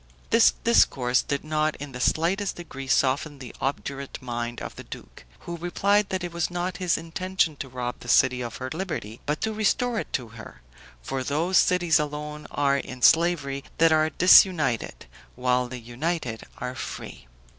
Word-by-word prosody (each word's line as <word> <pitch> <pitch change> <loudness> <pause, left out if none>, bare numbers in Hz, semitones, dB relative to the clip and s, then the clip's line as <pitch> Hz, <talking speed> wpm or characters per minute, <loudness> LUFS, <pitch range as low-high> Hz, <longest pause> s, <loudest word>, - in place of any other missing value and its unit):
This 230 0 +6
discourse 130 - +3
did 140 -3 -3
not 155 0 0
in 145 0 -8
the 125 - -7
slightest 185 +9 +1
degree 135 -6 -8
soften 140 +3 +1
the 130 -3 -10
obdurate 140 0 -4
mind 120 -1 -4
of - - -7
the - - -9
duke, - - -11 0.2
who 170 0 -6
replied 200 +4 +1
that 185 -1 -2
it 175 -1 -5
was 170 -1 -1
not 175 0 -3
his 180 -2 +1
intention 165 0 -1
to 135 - -6
rob 125 -1 -4
the - - -12
city 130 -1 +4
of 120 -1 -5
her 130 0 -6
liberty, 150 - -5
but 150 +1 -1
to 220 - -1
restore 225 +2 +1
it - - -6
to 120 -4 -2
her; 110 - -12 0.4
for 130 - -3
those 160 +8 +2
cities 175 -3 +3
alone 150 0 -5
are 140 -1 +1
in 130 -2 -8
slavery 155 -5 +3
that 165 0 +5
are 155 0 +3
disunited, 165 - +4 0.3
while 125 0 +1
the 125 +1 -7
united 120 +1 -4
are 125 0 -4
free. - - -8
150 Hz, 175 wpm, -25 LUFS, 130-175 Hz, 0.4 s, This